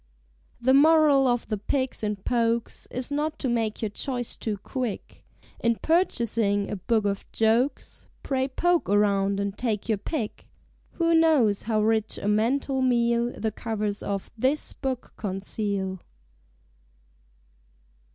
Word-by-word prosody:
The 260 +2 +3
Moral 295 -2 +5
of 240 -1 0
The 215 -2 -2
Pigs 260 +5 -2
and 210 -2 -3
Pokes 235 -1 0
Is 255 +3 -3
not 300 +2 -1
to 270 - -2
make 225 -2 -1
your 215 - 0
choice 245 +1 -3
too 215 -3 -3
quick. 245 +1 -5 0.4
In 235 0 +2
purchasing 230 - +1
a - - -1
Book 215 +3 0
of 200 -1 -1
Jokes, 230 +5 0 0.2
Pray 265 -1 0
poke 345 - +1
around 200 -1 +2
and 200 0 -2
take 220 -4 -2
your 215 -3 0
pick. 225 -2 -4 0.5
Who 335 -1 +1
knows 305 -11 +4
how 215 -1 0
rich 220 0 +1
a - - -4
mental 260 +6 +1
meal 235 -1 +2
The 220 - -1
covers 210 -1 -3
of 200 -1 -4
this 260 +6 0
book 265 -3 -4
conceal? 195 -1 -3
230 Hz, 135 wpm, -26 LUFS, 210-265 Hz, 0.5 s, Moral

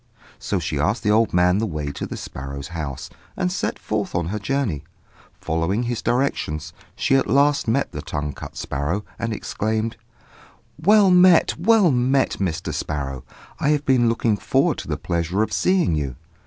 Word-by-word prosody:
So 100 - -2
she 80 -4 -2
asked 100 - 0
the 105 - +2
old 110 +1 +3
man 90 +2 +3
the 110 - 0
way 75 -5 -3
to - - -5
the - - -6
sparrows' 70 +2 -7
house, 75 -6 -5 0.3
and 180 -1 0
set 185 - -2
forth 105 -2 -3
on 85 -2 0
her 105 +2 -3
journey. 110 - -1 0.6
Following 85 +8 -1
his 120 -1 -2
directions, 120 - -1 0.2
she 135 - +2
at 135 - 0
last 140 0 +3
met 130 +5 +1
the - - -5
tongue 75 -1 -4
cut - - -9
sparrow, 75 +10 -2
and 115 - -2
exclaimed 110 +1 -2 0.8
"Well 200 +2 +6
met! 180 -1 +6
well 205 -2 +5
met! 130 +2 +2
Mr. 90 -3 -2
Sparrow. 70 -3 -4 0.4
I 145 - +1
have 150 -1 +1
been 125 -3 +4
looking 115 -2 +1
forward - - +1
to - - -7
the - - -2
pleasure 85 +4 -1
of - - -4
seeing 185 - +2
you." 70 -5 -2
105 Hz, 175 wpm, -22 LUFS, -, 0.8 s, Well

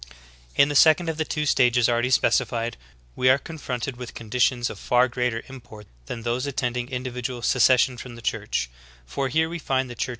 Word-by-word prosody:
18. - - +6
In 140 - +1
the 145 - -3
second 160 +3 +5
of 160 - -3
the 160 - -1
two 150 0 -2
stages 125 -4 +3
already 120 +1 +1
specified, 120 -2 +1 0.4
we 130 - +3
are 130 - +6
confronted 135 -4 -5
with 125 -1 -8
conditions 120 +2 0
of - - -10
far 125 +1 +3
greater 125 -2 -2
import 120 -5 -12 0.2
than 115 - -6
those 120 +3 -1
attending 125 -2 -2
individual 125 -1 -5
secession 125 0 +3
from 120 0 -9
the 115 - -11
Church; - - -2 0.4
for 135 - -2
here 160 +5 +1
we 170 +1 -5
find 130 -3 -1
the - - -6
Church 125 - -3
125 Hz, 195 wpm, -24 LUFS, 120-135 Hz, 0.4 s, 18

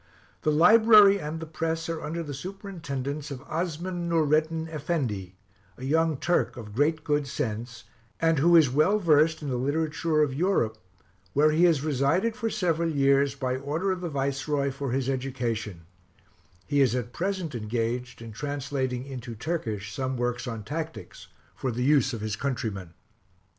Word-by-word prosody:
The - - +1
library 210 +4 +7
and 155 0 -5
the 160 - -5
press 160 +1 -3
are 165 -1 -3
under 165 +3 -3
the 145 -2 -6
superintendence 155 -4 -5
of 130 -2 -7
Osman 175 +2 -3
Noureddin 160 0 +1
Effendi, 135 - -3 0.4
a 125 - -10
young 160 +1 +2
Turk 175 -3 0
of 105 -3 -8
great 150 +5 +1
good 145 -2 0
sense, 115 -1 -4 0.4
and 165 -2 +2
who 170 +4 +5
is 160 -4 +7
well 155 +11 +3
versed 160 -4 +3
in 145 - -3
the 125 - -1
literature 155 +3 +1
of 140 -3 -1
Europe, 135 - 0 0.5
where 150 +2 +4
he 165 +3 +4
has 160 -5 +3
resided 155 - +1
for 230 -2 -2
several 170 -5 0
years, 140 -2 +3
by 130 -2 -1
order 155 +8 -1
of 185 -1 -3
the 175 - -3
Viceroy, 140 0 -1
for 135 -1 -4
his 130 0 -1
education: 120 -8 -3 0.8
he 145 -1 +2
is 125 -3 +3
at 120 -1 -3
present 185 0 -2
engaged 120 +2 -3
in 115 - -8
translating 135 0 -3
into 125 -3 -7
Turkish 110 - -3
some 130 +1 -2
works 120 +1 -2
on 115 -3 -5
tactics, 160 +7 -6 0.3
for 130 - -3
the 120 +2 -2
use 140 -1 +4
of 115 -4 -5
his 110 -1 -2
countrymen. 105 -9 -4
145 Hz, 165 wpm, -27 LUFS, 125-165 Hz, 0.8 s, library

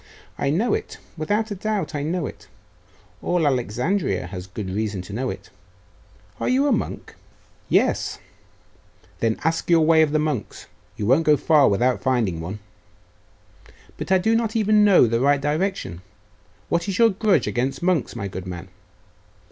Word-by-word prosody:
'I 140 - 0
know 205 +10 +1
it; - - -3 0.2
without 205 +7 -1
a - - -2
doubt 210 0 -2
I 145 - -2
know 165 +2 -2
it; - - -9 0.7
all 175 -3 0
Alexandria 125 - 0
has 90 0 -7
good 95 0 -6
reason 100 -2 -2
to 100 - -10
know 125 +4 -2
it. - - -8 0.9
Are - - -1
you 265 +3 +3
a 290 - +2
monk?' 225 - -3 0.6
'Yes.' - - +1 1.0
'Then 115 -1 0
ask 165 +2 -1
your 165 -2 +5
way 160 0 +5
of 155 -2 +2
the 155 - +2
monks; 150 -6 -3 0.3
you 105 - -3
won't 135 +9 +3
go 150 -1 +5
far 150 -2 +4
without 120 +5 +1
finding 115 -10 0
one.' 90 +6 -5 1.4
'But - - -6
I 190 - +6
do 220 +5 +1
not 225 -1 -1
even 215 -1 +4
know 200 -9 +6
the 115 0 0
right 140 +2 +3
direction; 145 - -2 0.7
what 170 +3 -1
is 190 - -2
your 230 -1 +5
grudge 195 - +2
against 135 +4 -2
monks, 175 -9 0
my 100 -4 -4
good 95 -1 -7
man? 90 +1 -7
150 Hz, 165 wpm, -23 LUFS, 110-190 Hz, 1.4 s, I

